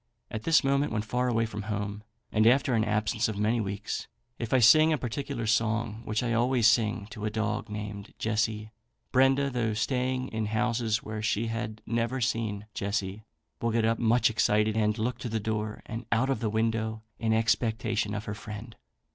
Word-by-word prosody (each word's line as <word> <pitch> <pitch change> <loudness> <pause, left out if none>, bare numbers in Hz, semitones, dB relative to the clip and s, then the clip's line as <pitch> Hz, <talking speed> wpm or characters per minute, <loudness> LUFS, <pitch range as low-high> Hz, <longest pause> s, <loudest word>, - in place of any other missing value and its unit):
At 110 0 -5
this 165 -2 +5
moment, 140 +2 +2
when 105 -1 -1
far 125 +3 0
away 115 -2 +2
from 105 -2 -5
home, 105 0 -3 0.3
and 110 0 +4
after 130 +1 +4
an 110 -2 +3
absence 110 +1 0
of 110 -2 -4
many 110 +3 +1
weeks, 100 0 -4 0.3
if 115 - -4
I 130 - +5
sing 155 +7 +7
a 155 - +2
particular 125 0 -4
song, 110 0 0
which 110 +2 -1
I 120 -1 0
always 120 0 +2
sing 110 -2 +3
to 110 -4 -5
a - - +1
dog 105 0 -2
named 105 -1 -6
Jessie, 110 -1 -1 0.4
Brenda, 135 +2 +4
though 115 -3 0
staying 130 +3 -1
in 110 -2 -2
houses 115 0 0
where 110 0 -5
she 110 +1 0
had 115 -1 -4
never 115 +2 -1
seen 110 -4 -1
Jessie, 100 +1 -3 0.4
will 115 - +1
get 115 0 +1
up 115 +1 +1
much 120 0 +3
excited, 105 -1 +2
and 105 0 +1
look 120 +2 -2
to 120 - -4
the 110 0 -1
door 105 0 -3
and 115 +1 -6
out 125 +4 +2
of 135 - 0
the 110 - -1
window 110 0 -1 0.2
in 115 -1 0
expectation 110 -1 +1
of 105 - -4
her 105 - -3
friend. 105 +1 -8
110 Hz, 190 wpm, -28 LUFS, 105-120 Hz, 0.4 s, sing